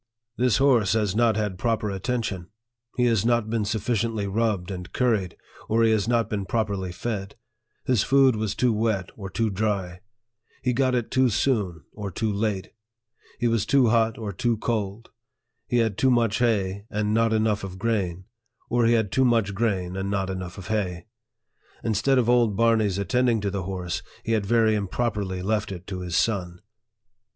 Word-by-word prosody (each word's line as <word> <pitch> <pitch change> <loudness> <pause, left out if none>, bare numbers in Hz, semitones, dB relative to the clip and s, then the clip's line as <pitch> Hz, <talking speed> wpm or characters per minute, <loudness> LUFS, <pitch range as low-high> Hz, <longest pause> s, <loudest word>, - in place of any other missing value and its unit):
" 115 0 -61
This 125 -4 +3
horse 120 -8 +3
has 105 -3 0
not 115 -1 +3
had 105 -4 -2
proper 110 -3 0
attention. 100 -3 -3 0.5
He 125 - +3
has 115 -4 +2
not 115 -2 +1
been 115 -2 0
sufficiently 110 0 -1
rubbed 100 -2 -1
and 90 -2 -7
curried, 110 -8 0 0.3
or 115 +1 +3
he 115 - +4
has 110 -1 +1
not 115 -1 +2
been 100 -2 -3
properly 100 -5 -1
fed; 100 0 -4 0.5
his 125 -5 +2
food 135 -2 +4
was 110 -1 -2
too 125 -2 +2
wet 105 -3 -1
or 100 -3 -7
too 110 +3 -1
dry; 95 -3 -2 0.6
he 125 -1 +1
got 130 0 +2
it 120 -2 -2
too 130 -1 +3
soon 100 - 0
or 105 -2 -5
too 105 +4 -2
late; 100 -2 -2 0.7
he 120 - +1
was 115 -3 +1
too 135 -4 +3
hot 115 -1 +2
or 105 -3 -5
too 115 +4 0
cold; 110 -1 -3 0.6
he 120 - +1
had 110 -3 +1
too 130 - +4
much 115 -3 +2
hay, 100 -4 0
and 105 0 -1
not 115 0 +3
enough 110 -2 +1
of 95 -1 -6
grain; 95 -5 -1 0.5
or 120 -1 +3
he 120 - +4
had 110 -4 +1
too 130 - +3
much 115 -5 +2
grain, 95 -4 -1
and 95 +1 -3
not 95 -1 -1
enough 95 -1 -6
of 95 +1 -9
hay; 90 -6 -2 0.8
instead 115 +5 +2
of 120 -3 +2
old 120 -4 +3
Barney's 110 -3 +2
attending 115 +4 +1
to 100 -1 -1
the 95 -2 -3
horse, 90 -3 -3 0.2
he - - -3
had 105 -3 +1
very 115 -1 +3
im 100 -2 -1
properly 100 -4 -2
left 105 +1 -1
it 90 -1 -7
to 95 -2 -5
his 90 -2 -4
son." 90 -6 0
110 Hz, 185 wpm, -25 LUFS, 95-115 Hz, 0.8 s, he